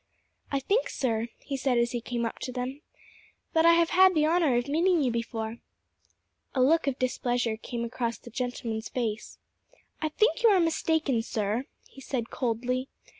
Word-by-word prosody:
"I 275 - +1
think, 405 - +1
sir," 230 -3 -1
he 280 - -5
said 260 -2 +1
as 235 0 +2
he 240 - -3
came 235 0 -2
up 230 - -4
to 255 - -4
them, 255 +3 -4 0.7
"that 325 +1 +5
I 335 - +8
have 335 0 +3
had 375 0 +6
the 305 -1 +4
honour 320 -5 +3
of 240 +2 0
meeting 335 +2 +2
you 250 - +1
before." 230 -1 -3 1.0
A 260 - +2
look 320 +3 +3
of 270 -2 0
displeasure 245 -2 0
came 235 +1 -5
across 235 0 -2
the - - -13
gentleman's 235 -2 -3
face. 225 -4 -3 0.6
"I 310 - 0
think 435 +10 +2
you 465 - +6
are 395 -3 +5
mistaken, 320 -6 +1
sir," 225 +1 -2 0.2
he 270 - -14
said 245 -3 -3
coldly. 250 +2 -1
255 Hz, 175 wpm, -28 LUFS, 235-315 Hz, 1.0 s, I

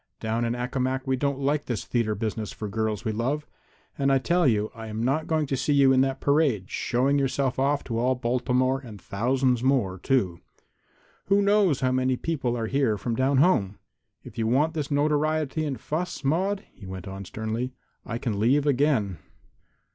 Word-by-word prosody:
"Down 115 +2 -1
in 115 +1 -1
Accomac 130 +1 -2
we 130 -1 +1
don't 140 +1 -1
like 140 +2 0
this 120 -5 -3
theatre 115 -3 0
business 110 0 -3
for 105 - -6
girls 110 -1 -2
we 110 - 0
love, 130 +8 -1 0.5
and 135 0 +2
I 135 - +5
tell 170 +5 +2
you 110 -3 +1
I 115 -1 -8
am 110 +1 -3
not 140 +6 0
going 160 -2 +1
to 135 - -1
see 140 +3 0
you 135 -2 +5
in 130 - +4
that 135 0 0
parade, 140 - +1
showing 135 +4 +1
yourself 135 -1 0
off 140 +2 +1
to 115 -3 -3
all 130 +2 +2
Baltimore 125 +2 +1
and 115 -7 -11
thousands 125 +6 0
more, 120 -9 +1
too. 95 -9 0 0.9
Who 200 +1 +3
knows 200 -8 +3
how 130 -1 +2
many 130 0 +1
people 130 -5 -2
are 115 - -2
here 130 -3 +1
from 115 +2 -2
down 130 +3 +2
home? 110 - +3 0.5
If - - -10
you 110 - +1
want 145 +7 +2
this 150 -4 -3
notoriety 155 +1 +1
and 140 -3 -3
fuss, 170 +2 -4
Maude," 190 +8 0
he 100 - -12
went 95 0 -7
on 95 +1 -6
sternly, 110 +6 -4 0.3
"I 115 -2 -4
can 115 -4 -2
leave 135 +7 +3
again." 130 - +1
130 Hz, 190 wpm, -26 LUFS, 115-145 Hz, 0.9 s, I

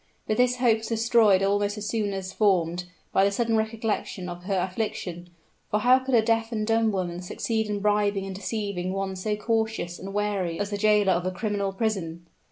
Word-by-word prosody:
But 215 - -1
this 250 0 +3
hope 240 -3 +3
was 220 - -7
destroyed 225 -4 +4
almost 205 +1 +1
as 210 0 -4
soon 210 -3 -1
as 190 -1 -5
formed, 180 -4 +1 0.3
by 195 - +4
the 200 - +4
sudden 225 +3 0
recollection 220 -4 -2
of 175 0 -8
her 195 -1 0
affliction; 180 -2 -3 0.4
for 210 - +1
how 255 +3 +6
could 260 -1 0
a 225 - +5
deaf 225 +1 +1
and 215 -2 -1
dumb 225 0 +2
woman 180 -3 -3
succeed 220 +4 -2
in 205 -1 -2
bribing 205 -1 +1
and 195 - -5
deceiving 195 -2 -3
one 195 0 -2
so 210 +3 -2
cautious 220 -5 -1
and 195 +1 -7
wary 200 -4 -1
as 205 0 -2
the 205 - -1
jailer 210 -2 +4
of 175 +1 -1
a - - 0
criminal 200 0 -2
prison? 190 -6 -2
205 Hz, 200 wpm, -26 LUFS, 190-220 Hz, 0.4 s, how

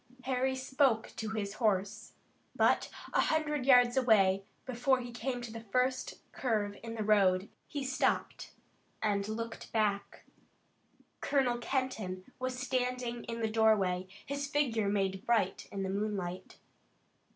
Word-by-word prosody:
Harry 260 +1 0
spoke 260 -3 +1
to 220 -1 -4
his 210 -2 -3
horse, 210 0 0 0.4
but - - +3 0.2
a - - +4
hundred 300 -4 0
yards 245 -2 +6
away, 200 -7 +4 0.2
before 255 +1 +1
he 245 -1 -6
came 245 +1 -3
to 235 - -6
the 230 - -6
first 250 +4 0 0.2
curve 210 -5 -1
in 230 0 -6
the 220 - -2
road, 195 -2 +3 0.2
he 285 -2 -4
stopped 260 0 -1 0.5
and 200 -2 +1
looked 225 +1 -5
back. 205 -2 -1 0.9
Colonel 255 -4 +1
Kenton 225 -8 -2 0.2
was 255 0 -2
standing 250 -2 -2
in 230 0 -4
the 220 - +1
doorway, 210 -5 +2 0.2
his 280 0 -3
figure 245 -8 +1
made 195 -1 0
bright 225 -6 +1
in 195 -1 -3
the - - -2
moonlight. 195 -3 -3
230 Hz, 135 wpm, -32 LUFS, 205-255 Hz, 0.9 s, yards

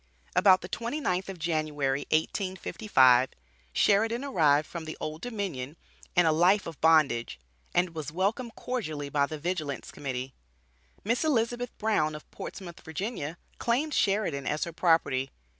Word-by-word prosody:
About 185 0 +6
the 175 - -6
twenty 235 +9 -3
ninth 185 -8 -1
of 190 - -6
January, 150 -4 -1
1855, 155 - +3 0.4
Sheridan 225 - +2
arrived 155 - +3
from 170 -2 -6
the 160 - -6
Old 155 +1 -5
Dominion 185 - -4 0.4
and 175 -1 +5
a 160 - +5
life 180 +6 +4
of 165 -3 -8
bondage, 150 - +3 0.4
and 175 -1 +2
was 155 -3 -5
welcomed 210 +7 -1
cordially 155 - -4
by 140 0 +2
the 155 - -5
Vigilance 155 -3 -3
Committee. 130 -1 -5 0.7
Miss 235 +7 +1
Elizabeth 245 -4 0
Brown 155 -9 +1
of 150 - -9
Portsmouth, 175 -3 -8
Va. 165 -2 -4 0.2
claimed 275 +6 0
Sheridan 195 - +1
as 150 - 0
her 170 - -5
property. 145 -6 +2
170 Hz, 140 wpm, -28 LUFS, 150-205 Hz, 0.7 s, About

